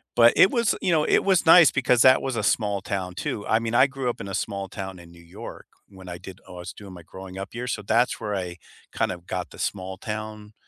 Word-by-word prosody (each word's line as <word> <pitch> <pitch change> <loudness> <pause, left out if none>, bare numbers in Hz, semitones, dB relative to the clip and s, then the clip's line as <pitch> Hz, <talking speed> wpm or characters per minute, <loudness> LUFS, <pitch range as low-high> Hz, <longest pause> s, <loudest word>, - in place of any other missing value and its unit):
but 120 0 +6
it 190 - +6
was, 235 -3 +1
you 180 - +1
know, 155 -2 +3
it - - +3
was 190 -3 +2
nice 165 -1 +8
because 125 -2 +2
that 130 0 +6
was 130 -2 -3
a 105 - -2
small 100 0 0
town, 95 -2 -4
too. 100 +2 -4
I 110 - +3
mean, 115 0 -4
I 130 +3 +6
grew 135 -2 -3
up 120 - -5
in - - -6
a 95 - -6
small 100 -1 -3
town 95 -2 -7
in 85 -1 -14
New 85 0 -16
York, 85 - -10 0.2
when 95 -2 -12
I 90 - -6
did 95 +1 -11
oh, 90 - -11
I - - -8
was 90 +1 -8
doing 100 -3 -12
my 85 -2 -12
growing 95 +2 -11
up 95 +1 -7
years, 125 +2 -3
so 105 - -5
that's 115 +5 +1
where 105 -1 -3
I 90 -2 -5 0.3
kind - - -1
of 90 0 -9
got 90 -1 -4
the - - -13
small 95 -1 -4
town 105 0 -7
105 Hz, 270 wpm, -24 LUFS, 95-120 Hz, 0.3 s, nice